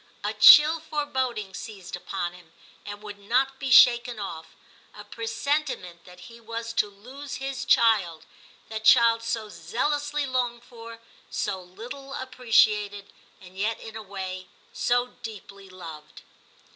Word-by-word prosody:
A -, -, -2 dB
chill 310 Hz, +2 st, +8 dB
foreboding 260 Hz, -10 st, -3 dB
seized 195 Hz, -3 st, -8 dB
upon 180 Hz, -1 st, -4 dB
him, 175 Hz, -2 st, -17 dB, 0.3 s
and 205 Hz, 0 st, -8 dB
would 205 Hz, -1 st, -9 dB
not 260 Hz, +6 st, 0 dB
be 275 Hz, -, -3 dB
shaken 245 Hz, -1 st, +6 dB
off, 165 Hz, -6 st, -7 dB, 0.2 s
— -, -, -29 dB
a -, -, -8 dB
presentiment 225 Hz, -, -3 dB
that 180 Hz, 0 st, -15 dB
he 235 Hz, +2 st, -13 dB
was 230 Hz, 0 st, -6 dB
to 215 Hz, -, +1 dB
lose 250 Hz, +8 st, -10 dB
his 270 Hz, 0 st, -5 dB
child, 180 Hz, -9 st, +3 dB, 0.4 s
that 220 Hz, 0 st, -5 dB
child 230 Hz, -1 st, +6 dB
so 230 Hz, -1 st, -3 dB
zealously 290 Hz, -, -2 dB
longed 245 Hz, -2 st, -2 dB
for, 230 Hz, -1 st, -12 dB, 0.3 s
so 190 Hz, -, -3 dB
little 245 Hz, +10 st, -9 dB
appreciated, 215 Hz, -6 st, +1 dB, 0.3 s
and 185 Hz, -1 st, -15 dB
yet 215 Hz, +2 st, -1 dB
in 220 Hz, -, -10 dB
a 220 Hz, -, -6 dB
way 190 Hz, -2 st, -7 dB, 0.3 s
so 245 Hz, 0 st, +1 dB, 0.2 s
deeply 200 Hz, -3 st, -10 dB
loved. 165 Hz, -5 st, -11 dB
225 Hz, 140 wpm, -26 LUFS, 195-255 Hz, 0.4 s, chill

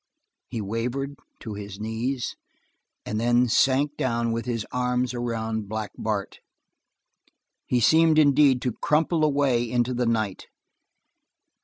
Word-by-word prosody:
He 115 Hz, -, -4 dB
wavered 120 Hz, +7 st, -3 dB, 0.3 s
to 110 Hz, -, -6 dB
his 100 Hz, -1 st, -8 dB
knees, 115 Hz, +4 st, -3 dB, 0.7 s
and 105 Hz, -, -2 dB
then 120 Hz, +2 st, +3 dB
sank 135 Hz, +5 st, +2 dB
down 120 Hz, -2 st, 0 dB
with 115 Hz, 0 st, -2 dB
his 115 Hz, -3 st, -2 dB
arms 125 Hz, 0 st, 0 dB
around 110 Hz, -3 st, -3 dB
Black 110 Hz, -1 st, -4 dB
Bart. 105 Hz, -2 st, -3 dB, 1.3 s
He 125 Hz, -, +2 dB
seemed, 160 Hz, +5 st, +5 dB
indeed, 140 Hz, -3 st, +5 dB
to 125 Hz, -, 0 dB
crumple 155 Hz, +4 st, +1 dB
away 140 Hz, -5 st, +2 dB
into 125 Hz, +1 st, 0 dB
the 125 Hz, -1 st, 0 dB
night. 110 Hz, -4 st, -1 dB
120 Hz, 125 wpm, -25 LUFS, 110-135 Hz, 1.3 s, seemed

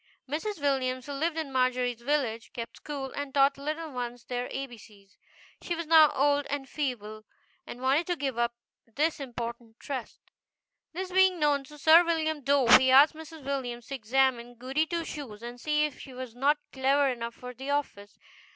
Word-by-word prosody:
Mrs. 325 Hz, +8 st, -3 dB
Williams, 255 Hz, -3 st, 0 dB
who 285 Hz, -, -7 dB
lived 315 Hz, +4 st, -1 dB
in 310 Hz, -4 st, -3 dB
Margery's 250 Hz, -2 st, 0 dB
village, 240 Hz, -4 st, -1 dB
kept 235 Hz, -1 st, -7 dB
school, 275 Hz, -3 st, -6 dB
and 285 Hz, -1 st, -5 dB
taught 275 Hz, 0 st, +3 dB
little 310 Hz, +2 st, -4 dB
ones 245 Hz, -2 st, -5 dB
their 245 Hz, 0 st, -3 dB
A 270 Hz, +1 st, -3 dB
B 245 Hz, -3 st, -12 dB
C's. 205 Hz, -2 st, -18 dB, 0.5 s
She 345 Hz, -, -3 dB
was 335 Hz, 0 st, -4 dB
now 315 Hz, -1 st, +7 dB
old 285 Hz, +1 st, +2 dB
and 280 Hz, -1 st, -4 dB
feeble, 215 Hz, -7 st, -4 dB, 0.4 s
and 245 Hz, -, -8 dB
wanted 280 Hz, +6 st, +2 dB
to 355 Hz, -, 0 dB
give 275 Hz, -5 st, -3 dB
up 235 Hz, 0 st, 0 dB, 0.3 s
this 300 Hz, +7 st, -1 dB
important 235 Hz, -3 st, -7 dB
trust. 265 Hz, -5 st, -6 dB
GOODY -, -, -62 dB
TWO 340 Hz, -, -17 dB
SHOES. 375 Hz, -, -8 dB
This 370 Hz, -, -9 dB
being 375 Hz, -2 st, +5 dB
known 290 Hz, -2 st, +2 dB
to 295 Hz, +2 st, -13 dB
Sir 320 Hz, +4 st, +7 dB
William 315 Hz, -3 st, 0 dB
Dove, 275 Hz, -3 st, +6 dB
he 260 Hz, 0 st, +2 dB
asked 275 Hz, +4 st, +7 dB
Mrs. 320 Hz, -1 st, -11 dB
Williams 245 Hz, -4 st, -3 dB
to -, -, -5 dB
examine 245 Hz, 0 st, +1 dB
Goody 265 Hz, +6 st, -1 dB
Two 335 Hz, 0 st, -2 dB
Shoes 240 Hz, -10 st, -8 dB
and 240 Hz, +1 st, -8 dB
see 300 Hz, +1 st, +2 dB
if 300 Hz, -, -6 dB
she 265 Hz, -2 st, -11 dB
was 255 Hz, -2 st, -7 dB
not 280 Hz, +4 st, +3 dB, 0.2 s
clever 275 Hz, +1 st, +3 dB
enough 235 Hz, -2 st, -3 dB
for 250 Hz, 0 st, -9 dB
the 265 Hz, +3 st, -8 dB
office. 205 Hz, -8 st, -3 dB
270 Hz, 195 wpm, -28 LUFS, 245-300 Hz, 0.5 s, now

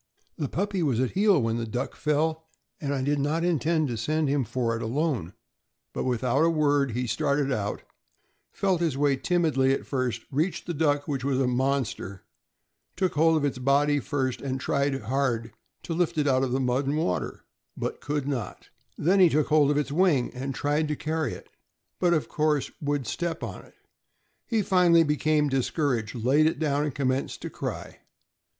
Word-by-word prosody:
The 145 Hz, -6 st, -3 dB
puppy 195 Hz, 0 st, -1 dB
was 135 Hz, -8 st, +1 dB
at 130 Hz, -1 st, +1 dB
heel 200 Hz, -3 st, +4 dB
when 115 Hz, -2 st, 0 dB
the 115 Hz, -1 st, -3 dB
duck 120 Hz, +5 st, -3 dB
fell, 160 Hz, +2 st, 0 dB, 0.3 s
and 140 Hz, -2 st, -3 dB
I 135 Hz, -2 st, -1 dB
did 145 Hz, +1 st, +1 dB
not 150 Hz, +4 st, 0 dB
intend 160 Hz, -2 st, +1 dB
to 120 Hz, -, -3 dB
send 155 Hz, +6 st, 0 dB
him 140 Hz, -1 st, +1 dB
for 115 Hz, -1 st, -1 dB
it 115 Hz, -, -4 dB
alone; 120 Hz, -, -1 dB, 0.6 s
but -, -, -3 dB
without 125 Hz, +2 st, +1 dB
a 165 Hz, -, +4 dB
word 145 Hz, -5 st, +2 dB
he 125 Hz, +2 st, -1 dB
started 140 Hz, +3 st, 0 dB
out, 105 Hz, -5 st, -2 dB, 0.7 s
felt 190 Hz, -3 st, 0 dB
his 160 Hz, -6 st, 0 dB
way 145 Hz, -1 st, +3 dB
timidly 135 Hz, -4 st, +2 dB
at -, -, -3 dB
first, 125 Hz, -4 st, -2 dB
reached 155 Hz, +7 st, -1 dB
the 175 Hz, -, -3 dB
duck, 145 Hz, -2 st, +1 dB
which 140 Hz, -4 st, -2 dB
was 135 Hz, -1 st, 0 dB
a 135 Hz, -, +2 dB
monster, 125 Hz, -7 st, -1 dB, 0.7 s
took 185 Hz, -3 st, 0 dB
hold 160 Hz, +1 st, +4 dB
of 145 Hz, -, 0 dB
its 135 Hz, -3 st, -2 dB
body 145 Hz, +3 st, +3 dB
first 130 Hz, -1 st, -2 dB
and 135 Hz, -1 st, -3 dB
tried 140 Hz, 0 st, 0 dB
hard 120 Hz, -1 st, -1 dB, 0.3 s
to 165 Hz, -, -4 dB
lift 170 Hz, -1 st, 0 dB
it 150 Hz, -1 st, +2 dB
out 130 Hz, -1 st, +3 dB
of 130 Hz, -2 st, 0 dB
the 130 Hz, -, +1 dB
mud 130 Hz, +1 st, 0 dB
and 145 Hz, +2 st, 0 dB
water, 90 Hz, -, -2 dB, 0.3 s
but -, -, -4 dB
could 145 Hz, -1 st, -2 dB
not; 130 Hz, -6 st, -4 dB, 0.3 s
then 185 Hz, +2 st, +5 dB
took 155 Hz, -1 st, +1 dB
hold 150 Hz, -2 st, +4 dB
of 145 Hz, -, +2 dB
its 150 Hz, -1 st, -1 dB
wing 155 Hz, -6 st, +2 dB
and 135 Hz, +1 st, -4 dB
tried 150 Hz, +2 st, 0 dB
to 150 Hz, -, -1 dB
carry 155 Hz, -3 st, -2 dB
it, -, -, -13 dB, 0.5 s
but 175 Hz, -1 st, +3 dB
of 155 Hz, -3 st, +1 dB
course 150 Hz, -2 st, 0 dB
would 145 Hz, -2 st, -1 dB
step 170 Hz, +7 st, -3 dB
on -, -, -6 dB
it. -, -, -20 dB, 0.7 s
He 225 Hz, -3 st, +1 dB
finally 175 Hz, -3 st, +5 dB
became 150 Hz, 0 st, +1 dB
discouraged, 135 Hz, -3 st, -1 dB
laid 135 Hz, +7 st, +3 dB
it 160 Hz, -, 0 dB
down, 145 Hz, -1 st, 0 dB
and 145 Hz, -, -4 dB
commenced 130 Hz, -1 st, -1 dB
to -, -, -5 dB
cry. -, -, -6 dB
145 Hz, 190 wpm, -26 LUFS, 130-155 Hz, 0.7 s, then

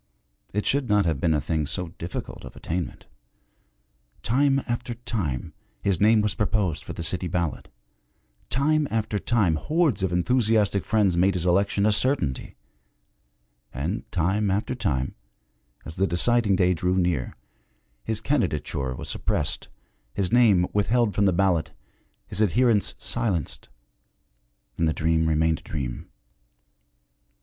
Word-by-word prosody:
It 105 Hz, +1 st, -2 dB
should 135 Hz, -3 st, +1 dB
not 105 Hz, -1 st, +3 dB
have 80 Hz, -5 st, 0 dB
been 80 Hz, -3 st, +2 dB
a -, -, +2 dB
thing 75 Hz, 0 st, -1 dB
so 90 Hz, +1 st, -3 dB
difficult 85 Hz, +1 st, -6 dB
of -, -, -10 dB
attainment. 85 Hz, +1 st, -4 dB, 1.2 s
Time 135 Hz, +3 st, +2 dB
after 120 Hz, 0 st, -3 dB
time 100 Hz, -, -4 dB, 0.3 s
his 95 Hz, -4 st, 0 dB
name 110 Hz, +1 st, +5 dB
was 105 Hz, -1 st, 0 dB
proposed 105 Hz, -7 st, -1 dB
for -, -, -7 dB
the 85 Hz, -, -5 dB
city 90 Hz, +2 st, -1 dB
ballot; 85 Hz, -2 st, -3 dB, 0.8 s
time 150 Hz, +3 st, +2 dB
after 110 Hz, -2 st, -1 dB
time 100 Hz, -10 st, +1 dB
hordes 155 Hz, -, +1 dB
of 95 Hz, -2 st, 0 dB
enthusiastic 105 Hz, +1 st, +2 dB
friends 105 Hz, -5 st, +2 dB
made 95 Hz, +2 st, +3 dB
his 90 Hz, -1 st, -2 dB
election 100 Hz, +3 st, +2 dB
a 110 Hz, -, +4 dB
certainty; 105 Hz, -, -1 dB, 1.2 s
and 85 Hz, -, -4 dB
time 95 Hz, +4 st, +1 dB
after 100 Hz, +6 st, -1 dB
time, 75 Hz, -, -1 dB, 0.7 s
as 80 Hz, -, -9 dB
the 95 Hz, +2 st, +2 dB
deciding 100 Hz, +4 st, +3 dB
day 90 Hz, 0 st, +3 dB
drew 90 Hz, +2 st, 0 dB
near, 85 Hz, -8 st, 0 dB, 0.7 s
his 110 Hz, -1 st, -2 dB
candidature 75 Hz, -, -1 dB
was -, -, -7 dB
suppressed, -, -, -1 dB, 0.5 s
his 95 Hz, -1 st, -1 dB
name 110 Hz, -7 st, +5 dB
withheld 110 Hz, +1 st, +2 dB
from 100 Hz, -, +2 dB
the 95 Hz, -, +4 dB
ballot, 90 Hz, -2 st, +1 dB, 0.5 s
his -, -, -3 dB
adherents 110 Hz, +1 st, +2 dB
silenced 100 Hz, -, -2 dB, 1.1 s
and 80 Hz, -, +2 dB
the 80 Hz, -, +1 dB
dream 80 Hz, 0 st, +1 dB
remained 80 Hz, 0 st, +2 dB
a -, -, -19 dB
dream. 65 Hz, -6 st, -5 dB
95 Hz, 140 wpm, -25 LUFS, 85-115 Hz, 1.2 s, name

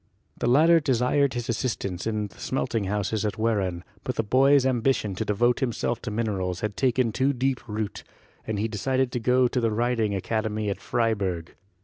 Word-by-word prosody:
The -, -, -2 dB
latter 160 Hz, +6 st, +6 dB
desired 135 Hz, -1 st, +1 dB
his 120 Hz, -1 st, -3 dB
assistance 110 Hz, -6 st, -2 dB
in 105 Hz, -2 st, -2 dB
the -, -, -19 dB
smelting 100 Hz, -, -1 dB
houses 105 Hz, +2 st, -1 dB
at 105 Hz, -, -2 dB
Wehran, 100 Hz, -6 st, 0 dB, 0.2 s
but 125 Hz, -, -3 dB
the -, -, 0 dB
boy's 135 Hz, +4 st, +4 dB
ambition 125 Hz, -4 st, +1 dB
to 95 Hz, -, -2 dB
devote 120 Hz, +4 st, +2 dB
himself 120 Hz, -1 st, -1 dB
to -, -, -4 dB
minerals 100 Hz, -5 st, -2 dB
had 105 Hz, -2 st, -2 dB
taken 125 Hz, -2 st, +1 dB
too 135 Hz, +5 st, +1 dB
deep 130 Hz, 0 st, -1 dB
root, 105 Hz, -1 st, -4 dB, 0.4 s
and 110 Hz, -2 st, -2 dB
he 105 Hz, +3 st, 0 dB
decided 130 Hz, +4 st, 0 dB
to 125 Hz, -, -2 dB
go 125 Hz, +2 st, +3 dB
to 125 Hz, +1 st, -1 dB
the 115 Hz, -, +2 dB
Riding 115 Hz, -2 st, 0 dB
Academy 110 Hz, +1 st, -1 dB
at -, -, -5 dB
Freiburg. 100 Hz, -8 st, -1 dB
115 Hz, 185 wpm, -26 LUFS, 105-125 Hz, 0.4 s, latter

